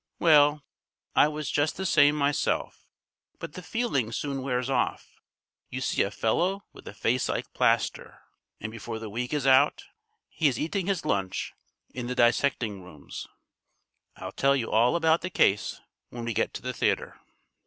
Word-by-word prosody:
"Well, 150 -2 +5 0.5
I - - +6
was 150 -2 -4
just 145 +2 0
the 190 - -3
same 145 -4 +5
myself. 145 -1 -1 0.5
But - - -8
the 180 - -8
feeling 180 - -1
soon 140 +2 -3
wears 125 -1 -1
off. 135 - -1 0.6
You 130 - -4
see 130 - 0
a 100 - +1
fellow 175 - 0
with - - -14
a - - -7
face 125 +4 0
like - - -3
plaster, - - 0 0.4
and 110 - -5
before 115 0 -6
the 110 -2 -7
week 120 +3 -3
is 145 -3 -1
out 130 -1 +4 0.5
he 160 - +1
is 130 -5 0
eating 180 +4 -2
his 195 -5 -1
lunch 95 -2 -1 0.4
in 125 -1 -5
the 125 - -3
dissecting 120 -4 +1
rooms. 80 -6 -10 0.9
I'll 95 - -7
tell 135 +6 +2
you 120 -4 -2
all 115 +5 +4
about 165 -1 +3
the 180 - -3
case 100 - +1 0.3
when 120 -1 -7
we 115 - -2
get - - 0
to - - -7
the 125 0 -3
theatre." - - -1
130 Hz, 170 wpm, -27 LUFS, 115-150 Hz, 0.9 s, I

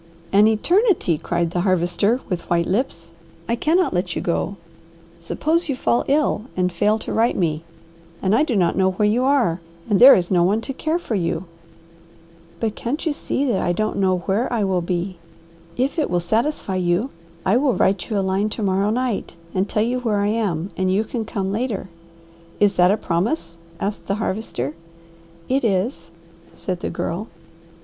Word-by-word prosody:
"An 205 +2 +6
eternity!" 335 - +2
cried 170 -1 -1
the 175 - 0
Harvester 185 +6 +1
with 180 -3 -4
white 170 -1 +2
lips. 180 -5 -2 0.4
"I 235 - +1
cannot 330 +8 +2
let 180 -1 -1
you - - -1
go. 185 +3 -1 0.6
Suppose 315 - -1
you 275 - 0
fall 240 -1 +1
ill 280 -6 +1
and 180 0 +1
fail 210 +5 +2
to - - -5
write 230 +2 +2
me, 160 -3 0 0.6
and 190 +1 +1
I 225 - +4
do 290 -6 +1
not 180 -4 +2
know 190 -1 +2
where 210 +3 +2
you 235 +4 +2
are, 255 -11 +2 0.3
and 210 -4 +2
there 260 +3 +10
is 175 0 -1
no 180 -2 +4
one 200 +5 +2
to 270 - -5
care 315 +5 -1
for 345 -9 -5
you." 175 -2 -1 1.1
"But 220 -2 -1
can't 280 +9 -3
you 315 - +1
see 285 -1 -2
that 235 -8 +1
I 175 - +1
don't 215 +2 -1
know 185 -2 +1
where 210 +6 0
I 230 -3 +1
will 190 -2 +1
be? 180 +1 -3 0.6
If 265 +6 0
it 300 - 0
will 175 - +1
satisfy 220 - -1
you, 180 +8 0 0.3
I 195 +5 +4
will 265 -2 +2
write 190 -1 +1
you 215 - 0
a 195 - +1
line 195 +3 +1
to 220 - -2
morrow 195 +1 +1
night 235 -6 -2 0.2
and 190 +2 0
tell 210 - +1
you 245 +2 0
where 225 -4 0
I 200 0 +1
am, 200 -5 -1
and 185 0 0
you 200 +3 +2
can 225 0 -4
come 195 -3 -3
later." 210 -3 -2 0.7
"Is 205 -1 +4
that 180 0 +4
a 205 - +3
promise?" 175 - -1 0.2
asked 200 +1 -4
the 195 - 0
Harvester. 190 - -3 0.7
"It 265 +1 +1
is," 190 -4 -1 0.5
said 180 -2 -4
the - - -3
Girl. 190 +7 -3
205 Hz, 190 wpm, -21 LUFS, 180-235 Hz, 1.1 s, there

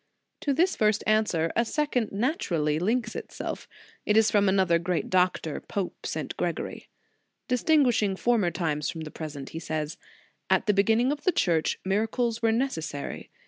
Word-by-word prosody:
To 285 - -1
this 340 +7 +2
first 215 -1 +2
answer, 210 -7 +2
a 235 - +3
second 250 -2 -1
naturally 180 - 0
links 225 +5 0
itself. - - -6 0.4
It 210 - +2
is 220 -1 +5
from 205 -2 +4
another 190 -3 +3
great 175 0 -2
doctor, 180 -4 +1
Pope 195 -3 -4
St. - - -4
Gregory. - - -3 0.6
Distinguishing 250 -6 +3
former 220 -3 +2
times 155 -4 -1
from 160 - -5
the 155 -1 -7
present, 145 -4 -7
he 165 - -6
says: 155 -2 -3 0.5
"At - - +3
the 210 - +3
beginning 225 +6 +3
of 290 0 -4
the 365 - +3
Church, 170 - +1
miracles 225 +4 0
were 225 -1 +3
ne 235 +4 +2
cessary. 160 - -5
205 Hz, 160 wpm, -27 LUFS, 170-235 Hz, 0.6 s, is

